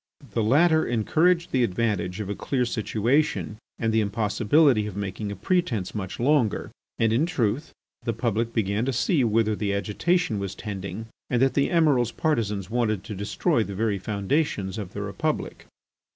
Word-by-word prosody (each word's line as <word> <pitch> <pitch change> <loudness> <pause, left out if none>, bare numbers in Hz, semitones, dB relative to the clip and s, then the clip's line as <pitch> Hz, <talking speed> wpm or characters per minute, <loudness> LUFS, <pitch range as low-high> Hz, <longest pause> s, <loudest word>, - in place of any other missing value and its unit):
The 115 - 0
latter 160 +8 +4 0.3
urged 170 +1 +3
the 130 -2 +2
advantage 100 -3 -1
of 105 - -3
a 100 - -2
clear 125 +4 -1
situation 120 +2 0 0.2
and 115 -1 0
the 110 - +3
impossibility 110 +4 +2
of 100 -2 -7
making 100 +1 -4
a - - -4
pretence 115 - -1
much 95 -4 -5
longer, 130 -3 +1 0.3
and 115 -1 +2
in 145 +8 +2
truth, 140 -3 -1 0.3
the 120 -1 -1
public 115 0 -1
began 105 -1 0
to 135 - -1
see 135 - +2
whither 110 -1 +2
the 100 -1 -1
agitation 130 - 0
was 100 -1 -4
tending 105 +1 -6 0.2
and 125 - +1
that 135 +1 +3
the 140 - +2
Emiral's 145 - +3
partisans 105 - -1
wanted 110 -3 0
to 110 - -7
destroy 110 - 0
the 100 -2 -6
very 105 -1 0
foundations 100 - -1
of 100 -4 -7
the - - -4
Republic. - - -3
115 Hz, 165 wpm, -25 LUFS, 100-135 Hz, 0.3 s, latter